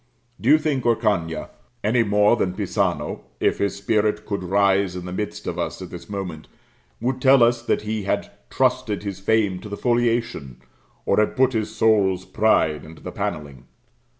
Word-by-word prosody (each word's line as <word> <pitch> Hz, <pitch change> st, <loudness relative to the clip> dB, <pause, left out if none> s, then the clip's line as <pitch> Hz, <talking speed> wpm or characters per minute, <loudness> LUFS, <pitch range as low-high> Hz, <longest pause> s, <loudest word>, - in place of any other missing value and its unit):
Do 120 Hz, -, +1 dB
you 155 Hz, -, +8 dB
think 150 Hz, -4 st, -1 dB
Orcagna, 100 Hz, -9 st, 0 dB, 0.3 s
any 115 Hz, +3 st, +3 dB
more 105 Hz, 0 st, +4 dB
than 95 Hz, -6 st, -1 dB
Pisano, -, -, -1 dB, 0.2 s
if -, -, +1 dB
his 100 Hz, -1 st, 0 dB
spirit 105 Hz, +1 st, 0 dB
could 100 Hz, -2 st, -3 dB
rise 95 Hz, 0 st, +2 dB
in 90 Hz, -1 st, -6 dB
the 90 Hz, -, -6 dB
midst 105 Hz, +2 st, -4 dB
of -, -, -4 dB
us -, -, -3 dB
at -, -, -8 dB
this -, -, -9 dB
moment, 90 Hz, -6 st, -5 dB, 0.5 s
would 125 Hz, +2 st, -2 dB
tell 130 Hz, -1 st, +6 dB
us 120 Hz, 0 st, +3 dB
that 120 Hz, -, -1 dB
he 110 Hz, 0 st, -2 dB
had 100 Hz, -, -2 dB, 0.2 s
trusted 130 Hz, -5 st, 0 dB
his 100 Hz, -2 st, -5 dB
fame 100 Hz, -2 st, +1 dB
to 105 Hz, -, -9 dB
the 100 Hz, -, -5 dB
foliation, 120 Hz, -, 0 dB, 0.5 s
or -, -, +2 dB
had 105 Hz, -, +1 dB
put 130 Hz, 0 st, +3 dB
his 110 Hz, -2 st, -2 dB
soul's 100 Hz, -4 st, +2 dB
pride 80 Hz, -9 st, +2 dB
into 80 Hz, 0 st, -13 dB
the -, -, -6 dB
panelling? 70 Hz, -5 st, -5 dB
105 Hz, 180 wpm, -23 LUFS, 95-120 Hz, 0.5 s, you